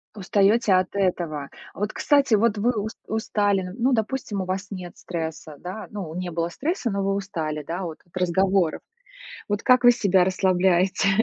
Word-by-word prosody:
Устаёте 205 +2 +3
от 185 0 +3
этого. 170 -7 -1 0.2
А - - -12
вот, 210 +1 -1
кстати, 280 -5 +3
вот 215 0 +2
вы 235 +4 +3
ус 215 +2 -3 0.2
устали. 205 -3 0
Ну, 255 +2 +2
допустим, 220 -2 -1
у - - -3
вас 190 +2 -3
нет 180 -3 -7
стресса, 160 -3 -5
да? 185 +5 -7
Ну, 190 -7 -6
не 180 0 -3
было 165 +1 -1
стресса, 290 - -2
но 200 0 -1
вы 195 0 +1
устали, 160 -7 -3
да? 175 +3 -3
Вот, 165 -2 -5
от 175 - -27
разговоров. 185 -1 +1 0.7
Вот 205 0 -1
как 255 0 +5
вы 245 - +9
себя 195 -6 +3
расслабляете? 185 +1 +2
195 Hz, 175 wpm, -24 LUFS, 180-215 Hz, 0.7 s, вы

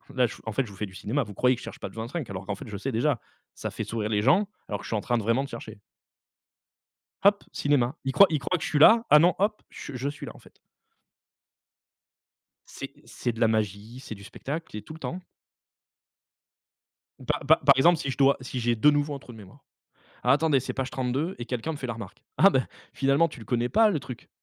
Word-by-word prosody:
Là, 125 -1 +3
je - - -9
en 110 - -4
fait, 130 +3 0
je 100 - -12
vous 95 - -13
fais 105 - -2
du 95 -1 -13
cinéma, 135 +8 -1
vous 105 - -10
croyez 125 +5 +3
que 120 - -11
je - - -12
cherche - - -9
page - - -7
25 120 +4 -5
alors 95 -1 -6
qu'en 100 - -3
fait 100 - -10
je 105 - -5
sais 130 +7 -3
déjà». 125 +2 +1 0.4
Ça - - -4
fait - - -4
sourire 110 -2 -3
les 105 -1 +1
gens, 175 - +4 0.2
alors 100 -2 -2
que - - -11
je - - -7
suis 110 - -1
en 105 - 0
train 120 - 0
de 110 - -2
vraiment 115 +5 +2
de 140 - -7
chercher. 110 -3 -9 1.4
Hop, 200 +1 +4
cinéma, 140 -1 +1
ils 135 - -1
croient 195 +8 +7
ils 155 - 0
croient 180 +6 -1
que - - -6
je - - -2
suis 150 - +1
là. 225 +8 +7
Ah 150 - +8
non, 175 +3 +5
hop, 210 +2 0
je 145 - -9
je 135 +3 -2
suis 145 - -8
là, - - -7
en - - -14
fait. - - -19 2.1
C'est - - -8
c'est 120 - -3
de 115 - -9
la 115 - +6
magie, 110 +2 -2
c'est 115 -4 -8
du 100 - -13
spectacle 150 +6 -6
et 105 - -5
tout 155 - -10
le 160 - -11
temps. 175 - -4 2.1
Pa - - 0
pa 160 +2 +6
par 140 0 +5
exemple, 170 +6 +5
si 140 - -3
je - - -4
dois 140 0 +4
si 130 0 -5
j'ai 120 0 +1
de 130 +7 +5
nouveau 145 0 +1
un - - -7
trou 125 - -13
de 110 - -12
mémoire: 95 -3 -15 0.6
«Alors, 125 - +5
attendez, 150 -3 +2
c'est 130 - -5
page 135 -1 -3
32» 135 +8 -2
et 120 - -4
quelqu'un 125 +6 -3
me 150 - -5
fait 130 - -5
la 120 - -2
remarque: 110 -5 -10
«Ah 195 - +7
bah, 130 -9 +1 0.3
finalement, 140 +4 +3
tu 150 - -11
ne 110 - -9
le - - -18
connais 120 +1 0
pas, 220 - +5
le 170 -7 0
truc» 130 -3 -10
130 Hz, 255 wpm, -27 LUFS, 110-150 Hz, 2.1 s, Ah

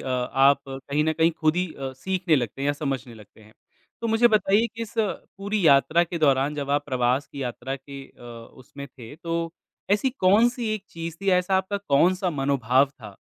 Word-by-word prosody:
अ, - - -6
आप 135 +2 +3
कहीं 140 +3 -2
न 160 - +1
कहीं 165 +1 +3
खुद 155 +1 +2
ही 180 0 +1
अ, 135 -1 -6
सीखने 180 0 0
लगते 125 +2 -3
हैं - - 0
या 145 - +2
समझने 135 -4 -4
लगते 105 0 -17
हैं। 110 0 -18 0.5
तो 230 - -2
मुझे 225 +2 +4
बताइए 215 +1 +3
कि 230 - -5
इस 225 - -8
पूरी 200 -2 -2
यात्रा 155 +4 +5
के 170 0 -5
दौरान 140 -1 +2
जब 140 -1 -4
आप 145 0 +1
प्रवास 130 +1 0
की 140 -1 -7
यात्रा 125 +2 -4
के 140 0 -11
अ, - - -21 0.3
उसमें 140 +2 -11
थे। 120 -2 -12
तो 165 0 -3 0.4
ऐसी 210 +6 +2
कौन-सी 235 +2 +2
एक 205 -2 -7
चीज़ 165 -1 -7
थी 195 - -3
ऐसा 180 +1 +2
आपका 190 +2 -1
कौन-सा 180 +6 +3
मनोभाव 135 -2 +2
था? 140 - -13
150 Hz, 200 wpm, -24 LUFS, 135-190 Hz, 0.5 s, यात्रा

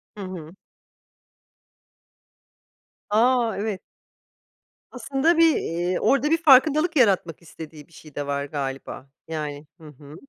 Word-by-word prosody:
Hı 205 - -8
hı. 180 -2 -9 2.5
A! 235 +1 +2
Evet. 205 -2 -4 1.1
Aslında 270 +7 0
bir, 330 -2 +5
eee, 175 +2 -2
orada 275 +3 +1
bir 330 - +4
farkındalık 305 +4 +4
yaratmak 190 - +1
istediği 160 -2 -12
bir 165 - -25
şey 155 -3 -16
de 145 -1 -4
var 140 0 -2
galiba, 135 -1 -6 0.2
yani. 150 -2 -6
Hı 155 - -13
hı. 150 +1 -14
180 Hz, 115 wpm, -23 LUFS, -, 2.5 s, bir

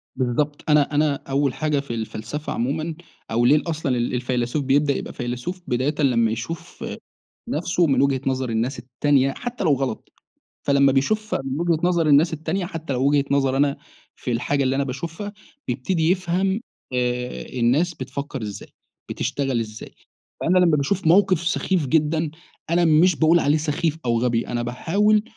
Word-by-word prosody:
بالضبط، 140 +4 -1
أنا 150 -1 +3
أنا 150 -1 +3
أوّل 140 -1 +1
حاجة 150 -2 0
في 140 -4 -5
الفلسفة 115 +6 -4
عمومًا 155 +7 -2 0.4
أو 120 +2 +2
ليه 150 +4 +5
أصلًا 150 -6 -1
ال 120 +1 -1
الفيلسوف 125 +2 -1
بيبدأ 140 +1 +3
يبقى - - -5
فيلسوف؟ 125 +9 -4
بدايةً 130 +5 0
لمّا 115 -5 +3
يشوف 120 +9 -6 0.6
نفسه 175 +2 +1
من 135 -2 +3
وجهة 135 -2 +2
نظر 130 -2 0
الناس 115 +4 -1
التانية 135 +2 +1
حتّى 240 - -5
لو 155 - +4
غلط، 130 -4 -4 0.6
فلما 140 -1 +5
بيشوف 215 +11 0
من 135 +1 -3
وجهة 170 -2 +1
نظر 175 -2 +2
الناس 150 +3 +5
التانية 160 +4 -2
حتّى 165 -5 -5
لو 130 +2 +1
وجهة 145 -1 +2
نظري 135 -1 +2
أنا 140 0 +2 0.4
في 125 - -4
الحاجة 140 +4 0
اللي 130 0 +1
أنا 140 - +1
باشوفها 165 +10 -5 0.3
بيبتدي 160 +7 +1
يفهم 190 +3 0 0.3
آآ، 125 0 -1 0.2
الناس 145 +9 +2
بتفكر 140 -1 -6
إزاي، 105 -2 -7 0.4
بتشتغل 135 -4 -1
إزاي، 110 -1 -7 0.5
فأنا 185 +2 +3
لمّا 170 -4 +4
باشوف 160 +5 0
موقف 185 0 +5
سخيف 175 -3 0
جدًا 155 +1 +1 0.4
أنا 170 +1 +3
مش 165 +2 +5
بأقول 165 +2 +4
عليه 150 0 +3
سخيف 155 +1 -1
أو 115 -1 +2
غبي 120 -1 0
أنا 120 0 -2
باحاول 205 - +2
145 Hz, 160 wpm, -23 LUFS, 125-165 Hz, 0.6 s, ليه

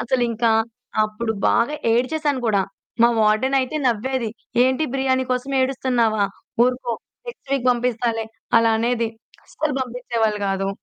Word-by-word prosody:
అసలింకా 235 -2 +1 0.5
అప్పుడు 220 +1 -3 0.2
బాగా 265 +6 +2 0.2
ఏడ్చేసాను 285 +3 0
కూడా. 200 -3 +3 0.4
మా 235 - +7
వార్డెన్ 215 +6 +3
అయితే 260 +4 -3
నవ్వేది. 235 0 0 0.3
"ఏంటి 260 +4 +2
బిర్యానీ 260 -1 +1
కోసం 250 +2 -2
ఏడుస్తున్నావా 245 -5 +1 0.4
ఊరుకో 250 -1 -1 0.3
నెక్స్ట్ 470 - -10
వీక్ 260 -2 0
పంపిస్తాలే" 235 -2 0 0.3
అలా 230 0 +3
అనేది. 235 0 0 0.4
అస్సలు 305 -3 -3
పంపించేవాళ్ళు 235 -4 -1
కాదు. 195 0 -1
245 Hz, 120 wpm, -22 LUFS, 225-260 Hz, 0.5 s, మా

